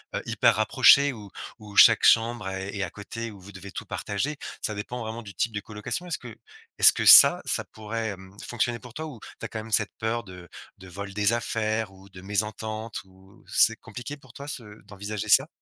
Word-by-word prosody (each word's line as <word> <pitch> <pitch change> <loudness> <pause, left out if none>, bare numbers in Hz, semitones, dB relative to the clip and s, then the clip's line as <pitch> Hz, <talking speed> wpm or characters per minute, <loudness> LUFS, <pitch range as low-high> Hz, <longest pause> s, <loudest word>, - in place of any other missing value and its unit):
heu, - - -3
hyper - - +2
rapprochée 130 +5 +4
où 105 -4 -12 0.3
où 105 -2 -13
chaque 115 -2 +7
chambre 115 -3 +2
est 95 +2 -6
est 100 - -4
à 95 - -3
côté, 115 +4 -8
où 105 -3 -13
vous 95 +2 -14
devez 95 0 -11
tout - - -8
partager. 140 +9 -4 0.3
Ça 105 - -1
dépend 115 +4 -7
vraiment 115 +1 -6
du 100 -4 -13
type 115 - -1
de 105 - -3
colocation. 105 - -6
Est-ce 170 - -3
que 120 -3 -12 0.4
est-ce - - +10
que - - -4
ça, - - +10
ça - - +1
pourrait, 110 +1 -6
hem, 95 -1 -11
fonctionner 120 0 -2
pour 125 -1 -14
toi? 160 - -5
Ou 140 -7 -10 0.2
tu - - -7
as - - -4
quand 110 - -7
même 110 +1 -10
cette - - +2
peur 115 +1 -2
de 90 -4 -13 0.3
de 95 - -13
vol 100 +2 -8
des 105 +2 +2
affaires 110 -2 -2
ou 95 +1 -18
de 95 -1 -13
mésentente 110 +2 -4
ou 95 +1 -22
C'est - - +3
compliqué 135 +4 -9
pour 130 -4 -20
toi, 140 0 -10
ce 140 -4 -5 0.2
d'envisager 105 +1 -7
ça? 135 +7 +5
110 Hz, 220 wpm, -25 LUFS, 100-120 Hz, 0.4 s, est-ce